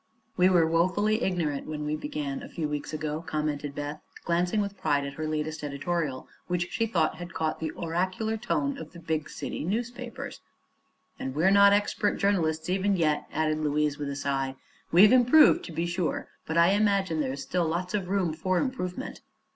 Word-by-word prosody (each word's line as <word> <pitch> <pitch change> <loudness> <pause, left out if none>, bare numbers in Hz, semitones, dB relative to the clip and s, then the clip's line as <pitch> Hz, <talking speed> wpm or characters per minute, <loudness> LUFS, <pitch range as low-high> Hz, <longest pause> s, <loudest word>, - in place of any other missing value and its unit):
"We 180 0 +5
were 175 -3 +5
woefully 185 +7 +2
ignorant 170 - -1
when 150 -1 -4
we 150 +1 -1
began, 145 -2 -4
a - - -9
few 160 -3 -3
weeks 150 -1 -4
ago," 155 0 -3
commented 150 -3 -3
Beth, 145 +1 -5 0.2
glancing 175 +4 +1
with 200 -1 -2
pride 145 -6 0
at 140 - -5
her 155 +1 -4
latest 155 0 -3
editorial, 145 -1 -2 0.2
which 175 0 -1
she 230 - 0
thought 170 -7 +1
had 175 -1 -8
caught 160 -1 -1
the 160 - -2
oracular 185 +6 -1
tone 275 +5 -1
of - - -9
the 170 - -10
big 160 -2 -2
city - - -5
newspapers. 235 +6 -4 0.8
"And 130 0 -4
we're 170 +6 +4
not 200 0 +7
expert 205 0 +1
journalists, 160 -6 +1
even 195 +2 +1
yet," 155 -3 +1
added 155 -1 0
Louise, 150 -1 0
with 145 -1 -3
a 140 - -4
sigh. 135 -1 -1 0.4
"We've 200 +7 +7
improved, 255 +5 +6
to - - -8
be 165 +1 -1
sure; 175 0 -2 0.2
but 160 - -1
I 170 +1 +6
imagine 200 -5 +2
there 130 -2 -1
is 140 0 -6
still 175 +4 0
lots 180 +4 -2
of 195 -4 -1
room 190 -5 +1
for 185 +4 0
improvement." 180 -9 -3
170 Hz, 185 wpm, -28 LUFS, 150-195 Hz, 0.8 s, not